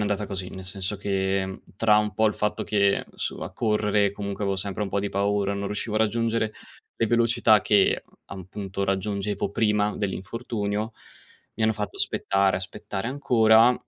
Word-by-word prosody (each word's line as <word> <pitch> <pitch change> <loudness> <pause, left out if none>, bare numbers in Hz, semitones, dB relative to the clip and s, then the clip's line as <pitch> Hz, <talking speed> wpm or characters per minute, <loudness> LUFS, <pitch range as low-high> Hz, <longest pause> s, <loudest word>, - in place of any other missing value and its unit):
andata 105 0 -1
così, 95 -2 -5
nel 95 - -8
senso 95 +1 -3
che, 95 -1 -1 0.2
tra 105 -2 +5
un 105 0 +1
po', 110 +2 +2
il 105 - +1
fatto 105 0 -1
che 100 -2 +2
su - - -4
a - - -5
correre, 105 -2 +2
comunque, 100 0 -5
avevo 100 -1 0
sempre 100 +2 -3
un 100 - -3
po' 100 - 0
di 100 - -2
paura, 100 0 0
non 100 0 -3
riuscivo 105 +2 -3
a - - +3
raggiungere 115 0 +1 0.4
le 115 - +1
velocità 115 -2 +4
che, 100 -2 +3 0.2
appunto, 95 +1 -5
raggiungevo 100 +1 -1
prima 105 0 +1
dell'infortunio, 105 +2 -3 0.6
mi 110 - -3
hanno 110 0 +4
fatto 105 -1 -5
aspettare, 95 -1 +1
aspettare 100 +2 -5
ancora, 120 -3 +5
105 Hz, 165 wpm, -25 LUFS, 100-110 Hz, 0.6 s, tra